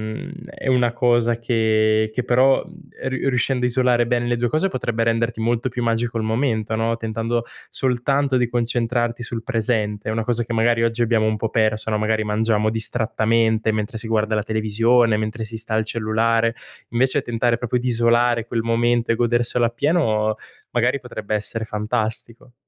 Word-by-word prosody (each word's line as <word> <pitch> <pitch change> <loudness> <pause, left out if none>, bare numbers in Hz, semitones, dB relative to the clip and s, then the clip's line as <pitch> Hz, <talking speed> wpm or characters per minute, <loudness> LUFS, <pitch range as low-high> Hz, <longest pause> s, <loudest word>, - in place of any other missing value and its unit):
mhmm, - - -7 0.3
è - - -8
una 125 -2 +2
cosa 120 -1 +2
che 110 -2 +2
che 125 +3 -2
però, 130 +3 +3
mhmm, 180 0 -16
e - - -3
riu 130 +1 -2
e - - +4
riuscendo 125 0 0
a - - +4
isolare 125 -1 +2
bene 120 0 0
le 120 0 +1
2 120 0 0
cose 155 +9 +1
potrebbe 120 -6 -2
renderti 115 0 0
molto 120 +2 0
più 120 0 -4
magico 115 0 0
il 110 - -1
momento, 110 -1 -1
no, 115 +1 0
tentando 115 +1 -2 0.3
soltanto 135 +2 0
di 125 -1 +1
concentrarti 120 0 -1
sul 120 -1 -5
presente. 110 -4 -1
È - - 0
una 110 0 -1
cosa 120 +1 0
che 115 - -5
magari 115 +1 +2
oggi 115 +1 +1
abbiamo 110 -2 +2
un 110 0 0
po' 110 +1 -2
perso 110 -1 0
no, 105 - 0
magari 110 0 0
mangiamo 110 0 +1
distrattamente 110 0 +1
mentre 110 +1 -3
si 110 - -3
guarda 110 -1 0
la 105 - +1
televisione, 110 +2 +2
mentre 110 +1 -3
si 110 +1 -7
sta 110 0 -4
al 110 - +3
cellulare. 115 +1 +1 0.3
Invece 130 +4 +1
tentare 120 -1 0
proprio 120 +1 -1
di 125 - -3
isolare 120 -1 +2
quel 115 -1 -1
momento 115 +1 +1
e - - +2
goderselo 120 0 +1
appieno, 115 -4 +1 0.4
magari 125 +3 +1
potrebbe 110 -4 -4
essere 110 +2 -3
fantastico. 110 +2 -3
115 Hz, 185 wpm, -21 LUFS, 110-120 Hz, 0.4 s, e